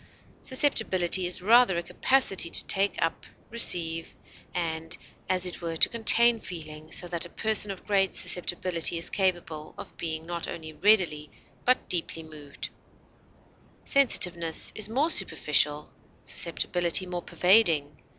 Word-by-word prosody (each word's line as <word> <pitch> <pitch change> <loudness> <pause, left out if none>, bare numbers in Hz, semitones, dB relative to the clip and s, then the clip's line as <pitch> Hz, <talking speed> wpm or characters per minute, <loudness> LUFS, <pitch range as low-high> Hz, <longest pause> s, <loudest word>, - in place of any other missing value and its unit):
Susceptibility 190 -10 +1
is 180 0 -1
rather 230 -3 +5
a 170 - -3
capacity 195 -6 +1
to - - -3
take 200 +1 +2
up, 165 - -3 0.2
receive, 165 -8 0 0.4
and, 165 -1 -3 0.3
as 185 -1 0
it 180 - -3
were, 165 -1 -4
to - - +4
contain 235 0 +4
feeling, 155 -5 -9
so 175 - -3
that 170 -1 -2
a - - -22
person 215 +1 -1
of 195 - -8
great 195 -2 +1
susceptibility 175 -1 +1
is 165 - -2
capable 175 -5 -2
of - - -10
being 160 -1 -4
not 170 0 -4
only 160 -1 -8
readily 175 -6 +1 0.4
but 255 +1 +1
deeply 165 -2 -2
moved; 150 -3 -9 1.1
sensitiveness 180 - +1
is 215 -1 -2
more 280 +8 +1
superficial, 150 - +1 0.3
susceptibility 175 +1 +1
more 180 -1 -5
pervading. 170 -7 +2
175 Hz, 130 wpm, -26 LUFS, 165-205 Hz, 1.1 s, rather